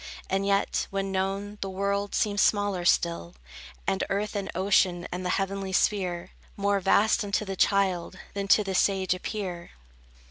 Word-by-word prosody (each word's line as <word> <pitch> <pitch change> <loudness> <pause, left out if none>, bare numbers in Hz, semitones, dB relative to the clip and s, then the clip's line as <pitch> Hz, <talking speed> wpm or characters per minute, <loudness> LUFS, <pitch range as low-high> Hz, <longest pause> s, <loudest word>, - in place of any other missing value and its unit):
And 195 +1 +1
yet, 200 0 +1
when 195 0 -2
known, 195 +2 -2
the 195 - -2
world 200 +1 -1
seems 205 -2 +1
smaller 205 -4 +2
still; 170 - +1 0.5
And 95 +6 0
earth 205 +2 -2
and 200 -1 -3
ocean, 185 -2 +2
and 180 +1 -4
the 180 - -2
heavenly 195 0 -3
sphere 180 -3 0 0.3
More 200 0 +1
vast 200 +3 +3
unto 205 +1 -1
the 195 -1 -4
child, 190 -3 +1 0.2
than 200 0 -3
to 210 - +5
the 195 -1 -3
sage 190 -1 +2
appear. 185 -2 -5
195 Hz, 155 wpm, -27 LUFS, 185-200 Hz, 0.5 s, to